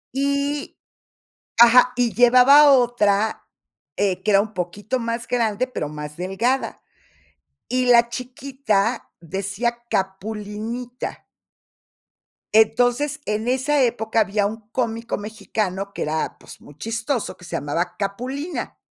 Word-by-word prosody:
Y 280 +1 -1 0.8
ajá, 245 +1 +7
y 245 -2 +1
llevaba 255 +5 +7
otra, 220 -5 +2 0.5
eh, 190 -2 0
que 210 - 0
era 200 0 +5
un 215 0 -7
poquito 200 +7 -3
más 230 0 -3
grande, 235 0 0
pero 195 - -4
más 150 0 -8
delgada. 215 +9 -1 0.9
Y 255 0 +1
la 235 -1 +5
chiquita 250 -3 -2
decía 200 +7 -3
Capulinita 215 +5 -4 1.3
entonces, 245 +7 +3
en 210 +2 -2
esa 265 +3 +1
época 230 -2 0
había 205 -1 +1
un 215 +1 -5
cómico 230 -1 -2
mexicano 205 -2 -4
que - - -4
era, 155 +1 -2
pues, - - -13
muy 145 - -15
chistoso, 225 - -3
que 180 - -15
se - - -5
llamaba 165 +5 -2
Capulina. 255 - -4
230 Hz, 115 wpm, -22 LUFS, 200-250 Hz, 1.3 s, ajá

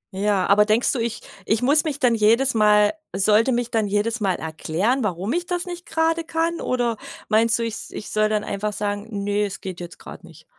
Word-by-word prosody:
Ja, 200 -1 +1
aber 205 +1 +5
denkst 220 +3 +2
du, 255 - -2
ich 230 0 -3 0.2
ich 220 +5 0
muss 290 +5 +4
mich 295 -2 -3
dann 250 -4 +3
jedes 230 +5 +3
Mal 210 -1 +4 0.2
sollte 215 +5 +3
mich 240 -1 -1
dann 220 -3 +1
jedes 210 +4 0
Mal 195 -4 0
erklären, 175 +11 -1
warum 195 +2 -2
ich 350 +1 -2
das 355 0 -2
nicht 350 -1 -8
grade 325 +1 0
kann? 330 +1 -2
Oder 240 -3 -1 0.3
meinst 225 +1 +3
du, 235 - -2
ich 230 -1 -3
s - - -7
ich - - -8
soll 215 0 +2
dann 210 -1 0
einfach 210 +1 -3
sagen: 205 +1 -3 0.2
„Ne, 205 +1 0
es 195 -2 -6
geht 185 -2 -7
jetzt 175 0 -9
grad - - -12
nicht?“ - - -16
220 Hz, 220 wpm, -22 LUFS, 205-250 Hz, 0.3 s, aber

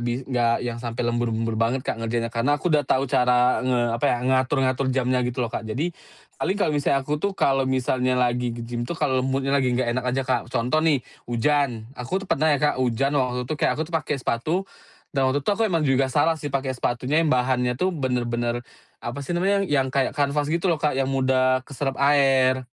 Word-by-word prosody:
bis 120 +1 -2
gak 120 -2 0
yang 120 -1 -4
sampai 120 0 -3
lembur-lembur 115 -1 -1
banget 125 +3 0
Kak 115 - -3
ngerjainnya 115 0 -2
karena 130 +5 +1
aku 170 +2 -1
udah 150 - +4
tahu 135 +1 +2
cara 125 -1 +3
nge 125 -1 +1 0.2
apa - - -1
ya - - +2
ngatur-ngatur 130 0 +1
jamnya 130 -1 +1
gitu 125 0 -1
loh 115 - -6
Kak 110 - -4
jadi, 155 +11 -2 0.5
paling 195 - 0
kalau 175 -7 +1
misal 140 -1 +1
aku 150 +1 -2
tuh 200 -1 -2
kalau 135 -1 +2
misalnya 130 -1 0
lagi 125 0 +1
ke-gym 120 0 -5
tuh 170 - -3
kalau 130 -5 +1
mood-nya 135 +1 -1
lagi 135 -2 +2
gak 120 -2 0
enak 130 0 -2
aja 135 +2 0
Kak, 130 -3 -1
contoh 125 +7 0
nih 150 -5 +2 0.2
hujan 120 -1 0
aku 180 +11 -4
tuh - - -13
pernah 155 +3 +2
ya 145 - +4
Kak 140 -3 +1
hujan 130 +3 +1
waktu 125 -3 0
itu 145 - -3
kayak - - +3
aku 155 - -1
tuh 165 - -14
pakai 155 -3 -1
sepatu, 125 +4 -2 0.6
dan 135 -2 +2
waktu 140 +1 -1
itu - - +1
aku 225 +1 +1
emang 165 -5 0
juga 135 -1 +2
salah 145 +5 +2
sih 145 - -4
pakai 135 -1 -2
sepatunya 125 +5 0
yang 160 - +1
bahannya 125 -1 +1
tuh 185 +7 0
bener-bener, 120 -4 -2 0.4
apa 120 +4 -4
sih 170 +5 -3
namanya 195 +3 +2
yang 135 -3 +1
kayak 135 +1 0
kanvas 145 0 0
gitu 170 +3 -1
loh 155 - -3
Kak 150 -3 0
yang 135 0 0
mudah 130 -1 +2
keserap 135 -1 -3
air, 135 -2 +3
130 Hz, 215 wpm, -24 LUFS, 125-145 Hz, 0.6 s, udah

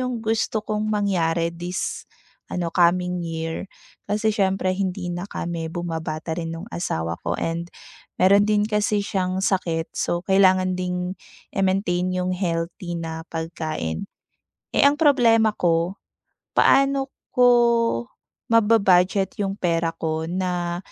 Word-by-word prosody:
yung 250 -3 -3
gusto 220 -1 0
kong 215 0 -2
mangyari 170 -5 +1
this 175 +2 -4 0.4
ano 170 -2 -3
coming 180 0 +2
year. 165 +1 -4 0.4
Kasi 215 +1 +1
siyempre 190 -2 +1
hindi 185 -1 -2
na 175 +3 -5
kami 170 -3 -4
bumabata 160 -1 -4
rin 165 0 -4
nung 180 +6 -8
asawa 85 - -3
ko 85 +1 -2
and 170 +1 -3 0.5
mayro'n 200 +2 +5
din 210 -1 +3
kasi 210 -1 0
siyang 190 -1 -1
sakit, 165 -4 -1
so 175 +1 -2
kailangan 185 -1 +4
ding 180 0 -2 0.4
i-maintain 190 -2 +1
yung 180 0 -1
healthy 175 -1 -3
na 160 -1 -5
pagkain. 155 - -4 0.7
Eh, - - +5
ang 285 +1 +4
problema 230 -7 +4
ko 170 +2 +1 0.6
paano 275 0 +4 0.2
ko 250 0 +6 1.0
maba-budget 205 -1 +3
yung 195 0 -1
pera 170 -2 0
ko 160 0 -2
na 175 -1 -2
180 Hz, 125 wpm, -23 LUFS, 170-205 Hz, 1.0 s, ko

